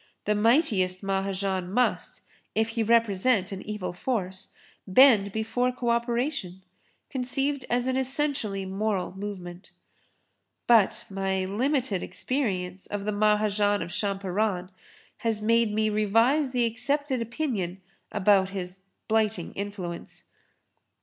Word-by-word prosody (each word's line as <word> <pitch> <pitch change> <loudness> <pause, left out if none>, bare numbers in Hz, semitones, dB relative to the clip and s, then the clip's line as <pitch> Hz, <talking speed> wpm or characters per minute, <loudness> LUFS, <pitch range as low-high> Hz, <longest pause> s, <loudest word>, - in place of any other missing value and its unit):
The 210 - +2
mightiest 210 - +2
Mahajan 195 -1 -1
must, 250 +4 0 0.3
if 220 +1 +2
he 225 0 -2
represent 220 -2 +2
an 195 -1 -5
evil 210 -4 -4
force, 190 -3 -3 0.4
bend 205 -1 +6
before 225 +4 0
co 245 -1 -1
operation, 235 - -1 0.5
conceived 270 +1 -1
as 245 0 +1
an 260 0 0
essentially 265 -7 -1
moral 190 -1 -2
movement. 190 -3 -7 1.0
But 230 -5 +4
my 190 -1 -1
limited 235 0 0
experience 190 -9 -2
of 205 -1 -4
the 210 - 0
Mahajan 210 -1 +2
of 170 - -8
Champaran 195 -1 -1 0.5
has 225 -2 -1
made 230 +1 +3
me 215 +1 +1
revise 225 +8 +3
the 250 -2 +1
accepted 265 +3 0
opinion 230 - -3 0.3
about 195 -2 +3
his 185 -1 -6 0.3
'blighting 215 -5 0
influence.' 195 -4 -6
210 Hz, 115 wpm, -27 LUFS, 190-240 Hz, 1.0 s, bend